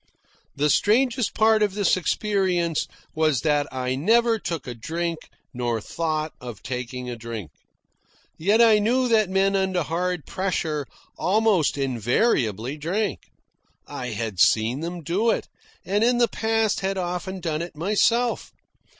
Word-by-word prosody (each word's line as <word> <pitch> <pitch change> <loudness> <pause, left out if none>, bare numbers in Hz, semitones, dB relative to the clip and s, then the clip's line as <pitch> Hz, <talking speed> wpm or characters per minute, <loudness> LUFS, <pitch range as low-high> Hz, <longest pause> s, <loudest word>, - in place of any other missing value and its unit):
The 150 +1 +2
strangest 240 +2 +2
part 220 0 +4
of 205 -2 +1
this 205 -4 +3
experience 185 -3 0 0.3
was 155 -5 +1
that 145 -2 +1
I 130 -1 -2
never 225 - +3
took 165 -7 -4
a 125 - -5
drink 165 +7 -4 0.2
nor 120 -2 -1
thought 155 +4 -3
of 120 -4 -8
taking 125 0 -5
a 120 - -4
drink. 115 -6 -7 0.8
Yet 205 +8 +3
I 220 -2 +6
knew 250 +5 +2
that 215 -4 +3
men 195 +1 +2
under 190 -2 +1
hard 175 +1 -2
pressure 160 -6 -2 0.3
almost 200 -6 +2
invariably 125 - 0
drank. 190 +8 -2 0.6
I 125 - -6
had 110 -4 -4
seen 115 +7 +3
them 170 +1 -5
do 195 +9 +1
it, - - 0 0.4
and 205 +3 +1
in 240 +1 +3
the 240 -1 +4
past 225 0 0
had 195 0 -2
often 180 +1 -3
done 160 -3 -2
it 170 -2 -7
myself. 230 +7 +1
175 Hz, 140 wpm, -24 LUFS, 135-210 Hz, 0.8 s, I